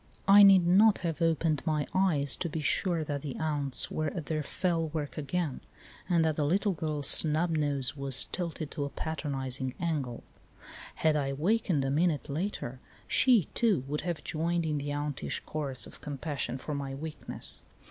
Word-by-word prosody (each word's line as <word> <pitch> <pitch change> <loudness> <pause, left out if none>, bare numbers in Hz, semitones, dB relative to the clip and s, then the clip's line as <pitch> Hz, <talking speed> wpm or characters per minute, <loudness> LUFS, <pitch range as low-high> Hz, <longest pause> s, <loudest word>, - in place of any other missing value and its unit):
I 200 +1 +9
need 195 -3 +8
not 205 +5 +5
have 165 -1 -2
opened 165 -2 +1
my 150 -2 0
eyes 165 -7 +2
to 170 - -2
be 160 - -4
sure 165 +2 0
that 145 -2 -3
the 140 -3 -5
aunts 145 -4 0
were 155 - -1
at 155 +1 -4
their 155 0 -1
fell 165 +2 -1
work 150 -2 -4
again, 155 -1 -2 0.5
and 170 -2 +3
that 155 -1 0
the 150 - +1
little 195 +7 +2
girl's 155 -4 -2
snub 160 +4 +4
nose 145 -4 0
was 135 -3 +3
tilted 165 -4 -4
to 145 - -3
a 140 - -3
patronising 135 -5 -4
angfel. 150 -9 -2 0.7
Had 155 -1 +2
I 145 -2 0
awakened 160 +1 0
a 135 - 0
minute 155 0 +1
later 140 -5 -3 0.3
she, 245 -7 +4
too, 210 - +2
would 150 +2 -2
have 170 -1 -4
joined 170 +1 -1
in 150 -2 -1
the 145 +1 -4
auntish 145 -1 -3
chorus 140 -4 -2
of - - -11
compassion 145 -2 -4
for 150 +3 -5
my 140 -1 -4
weak 155 +2 -8
ness. - - -4
155 Hz, 180 wpm, -30 LUFS, 140-170 Hz, 0.7 s, I